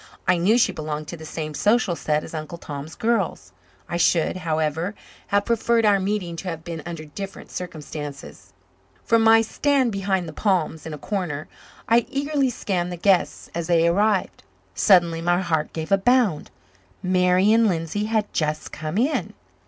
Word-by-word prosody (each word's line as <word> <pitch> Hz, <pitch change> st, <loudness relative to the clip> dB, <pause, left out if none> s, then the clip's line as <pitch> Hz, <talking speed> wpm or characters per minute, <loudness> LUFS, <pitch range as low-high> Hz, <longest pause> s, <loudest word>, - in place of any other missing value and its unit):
I 180 Hz, -, +4 dB
knew 200 Hz, +7 st, +3 dB
she 245 Hz, -, +3 dB
belonged 150 Hz, -1 st, -5 dB
to -, -, -5 dB
the 160 Hz, -1 st, -10 dB
same 155 Hz, -1 st, -5 dB
social 210 Hz, +1 st, +2 dB
set 150 Hz, -2 st, -1 dB
as -, -, -10 dB
Uncle 155 Hz, +1 st, -5 dB
Tom's 145 Hz, -1 st, -7 dB
girls. 200 Hz, -, -1 dB, 0.4 s
I 170 Hz, -, -2 dB
should, 170 Hz, +1 st, +2 dB
however, 160 Hz, +2 st, -1 dB, 0.3 s
have 200 Hz, 0 st, +1 dB
preferred 235 Hz, 0 st, +2 dB
our 205 Hz, -2 st, +4 dB
meeting 190 Hz, -3 st, -2 dB
to 190 Hz, -, -6 dB
have 165 Hz, -1 st, -6 dB
been 165 Hz, -2 st, -6 dB
under 165 Hz, -2 st, -6 dB
different 195 Hz, +6 st, -8 dB
circumstances. 145 Hz, -, -7 dB, 0.5 s
From 230 Hz, 0 st, +3 dB
my 225 Hz, 0 st, +6 dB
stand 270 Hz, +1 st, +1 dB
behind 195 Hz, -3 st, -1 dB
the 160 Hz, -, -7 dB
palms 165 Hz, -5 st, 0 dB
in 160 Hz, -, -6 dB
a -, -, -9 dB
corner 170 Hz, -5 st, -3 dB, 0.4 s
I 230 Hz, +1 st, +3 dB
eagerly 280 Hz, -1 st, 0 dB
scanned 180 Hz, -6 st, -2 dB
the 175 Hz, -, -5 dB
guests 190 Hz, +1 st, +1 dB
as 170 Hz, -1 st, -3 dB
they 170 Hz, -1 st, +4 dB
arrived. 200 Hz, +2 st, +1 dB, 0.3 s
Suddenly 170 Hz, -, +4 dB
my 175 Hz, +1 st, +2 dB
heart 160 Hz, -4 st, -1 dB
gave 160 Hz, +1 st, -5 dB
a 195 Hz, -, +5 dB
bound. 235 Hz, -7 st, +2 dB, 0.5 s
Marian 185 Hz, +5 st, +4 dB
Lindsay 175 Hz, +3 st, -1 dB
had 215 Hz, -1 st, -1 dB
just 155 Hz, -1 st, -2 dB
come 155 Hz, +4 st, -4 dB
in. 265 Hz, +7 st, 0 dB
180 Hz, 170 wpm, -23 LUFS, 160-210 Hz, 0.5 s, my